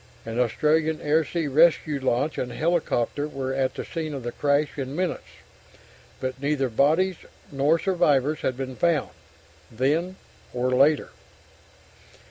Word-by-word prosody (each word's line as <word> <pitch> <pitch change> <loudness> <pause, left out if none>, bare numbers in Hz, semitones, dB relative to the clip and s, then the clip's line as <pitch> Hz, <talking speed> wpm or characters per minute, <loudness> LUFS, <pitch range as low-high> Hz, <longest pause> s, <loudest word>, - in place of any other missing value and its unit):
An 115 +1 -4
Australian 155 +6 +1
air 155 +2 +2
sea 165 0 -3
rescue 155 0 +3
launch 130 +3 0
and 125 - -3
helicopter 150 -3 0
were 135 -3 -4
at 130 -1 -1
the - - -5
scene 160 -3 -4
of 135 - -6
the 120 - -3
crash 145 +2 0
in 135 0 -5
minutes, 180 0 -3 0.9
but 130 0 -4
neither 140 -2 0
bodies 160 +10 +2 0.3
nor 145 +4 +2
survivors 155 -6 +1
had 130 - -2
been 130 -1 -5
found, 165 -3 +1 0.6
then 150 +10 0 0.4
or 125 +1 0
later.... 140 +4 +3
145 Hz, 135 wpm, -25 LUFS, 130-160 Hz, 0.9 s, rescue